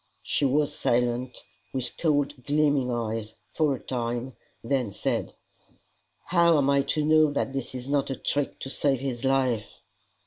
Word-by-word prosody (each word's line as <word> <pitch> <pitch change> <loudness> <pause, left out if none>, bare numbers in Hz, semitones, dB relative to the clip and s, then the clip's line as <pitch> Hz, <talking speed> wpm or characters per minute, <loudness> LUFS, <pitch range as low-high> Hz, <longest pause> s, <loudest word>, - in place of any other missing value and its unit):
She 145 - 0
was 145 +2 +2
silent, 125 +1 0 0.3
with 130 -2 -2
cold 145 -4 0
gleaming 145 -3 +2
eyes, 115 -2 -3 0.2
for 150 -4 +1
a - - -9
time, 120 0 -3 0.3
then 125 -1 0
said, 100 - -2 0.9
"How 170 -2 +4
am 140 -1 +3
I 140 0 +4 0.2
to 150 - +1
know 155 0 +5
that 140 -1 -2
this 135 -1 -4
is 125 0 -6
not 140 -1 +1
a 135 - -2
trick 145 +1 -1
to 135 - -5
save 140 -3 +1
his 130 -2 -4
life?" 130 -5 0
135 Hz, 160 wpm, -27 LUFS, 125-145 Hz, 0.9 s, know